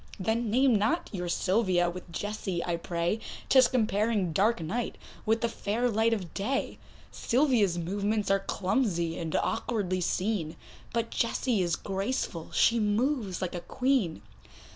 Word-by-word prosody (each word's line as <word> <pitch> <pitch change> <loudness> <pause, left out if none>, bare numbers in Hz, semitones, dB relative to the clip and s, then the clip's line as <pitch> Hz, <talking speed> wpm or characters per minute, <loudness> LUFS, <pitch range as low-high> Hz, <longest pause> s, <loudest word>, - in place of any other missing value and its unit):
Then 220 +4 0
name 255 +3 +4
not 220 - 0
your 180 -2 -3
Sylvia 185 -1 +2
with 175 0 -6
Jessie 195 -2 -3
I 175 - 0
pray, 170 +4 -1 0.3
'Tis 260 -2 +7
comparing 215 -6 +1
dark 210 +6 +2
night 215 +9 -3 0.3
with 225 +1 +2
the 235 - +2
fair 230 +2 -1
light 225 +2 +2
of 190 -7 -3
day; 260 +8 -2 0.3
Sylvia's 235 - +2
movements 200 +4 -1
are 195 - +4
clumsy, 185 -4 -1
and 165 -2 -3
awkwardly 200 -5 -1
seen, 180 -3 -1 0.4
But 230 0 -1
Jessie 230 -2 0
is 175 -1 +1
graceful, 195 -4 -3
she 235 0 +4
moves 210 - 0
like 185 - -3
a 175 - -4
Queen. 250 - 0
205 Hz, 140 wpm, -29 LUFS, 180-230 Hz, 0.4 s, Tis